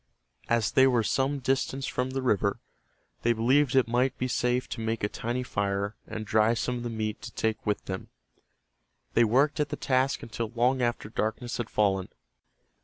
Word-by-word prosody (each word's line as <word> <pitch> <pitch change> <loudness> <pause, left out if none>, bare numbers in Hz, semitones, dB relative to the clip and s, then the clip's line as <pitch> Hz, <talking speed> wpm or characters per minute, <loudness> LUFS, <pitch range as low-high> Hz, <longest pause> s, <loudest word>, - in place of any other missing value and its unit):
As 115 -3 +2
they 130 0 +6
were 120 -3 +3
some 135 +5 +1
distance 135 0 -1
from 125 0 -1
the 130 0 -3
river, 100 -4 +1 0.6
they 120 - +3
believed 130 +4 +3
it 130 -3 +4
might 125 +3 +1
be 125 - -1
safe 125 0 0
to 115 - -5
make 110 -1 -2
a - - +3
tiny 120 +4 -3
fire 100 -2 -1
and 110 -1 -5
dry 110 +2 +3
some 125 +1 -1
of - - -5
the 120 - -3
meat 110 -2 -3
to 120 - -7
take 110 -1 -1
with 105 - 0
them. 95 -1 -5 1.1
They 120 - +5
worked 135 +8 +3
at 150 -1 +1
the - - -2
task 130 +1 +1
until 115 0 -4
long 125 +2 +2
after 120 -3 -1
darkness 110 +2 -2
had 120 -2 -3
fallen. 95 -3 +1
120 Hz, 185 wpm, -28 LUFS, 110-130 Hz, 1.1 s, they